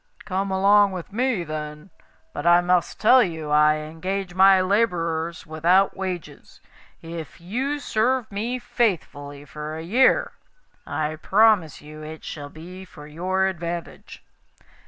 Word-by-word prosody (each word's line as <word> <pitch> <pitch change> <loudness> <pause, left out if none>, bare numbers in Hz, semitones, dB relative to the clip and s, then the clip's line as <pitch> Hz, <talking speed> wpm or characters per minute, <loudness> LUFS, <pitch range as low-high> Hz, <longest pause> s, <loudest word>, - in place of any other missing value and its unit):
'Come 195 0 -2
along 200 +1 +4
with 180 +1 -8
me, 240 -5 0
then. 150 +2 -7 0.4
But 145 +3 -3
I 175 0 +7
must 175 -1 0
tell 250 +4 +6
you 160 -7 -3
I 150 0 +5
engage 175 +5 -5
my 190 +1 +6
labourers 170 -5 0
without 170 +5 +2
wages. 185 -3 -7 0.4
If 165 -2 -8
you 250 +12 -2
serve 245 -2 0
me 225 +5 -2
faithfully 145 - -2
for 150 +2 -7
a 160 - -6
year, 235 +10 +3 0.6
I 155 0 -3
promise 200 -3 +3
you 155 +1 -11
it 155 +1 -9
shall 145 -2 -7
be 180 +5 -11
for 180 -5 -13
your 185 +5 -1
advantage. 170 -2 -6
175 Hz, 135 wpm, -23 LUFS, 155-195 Hz, 0.6 s, I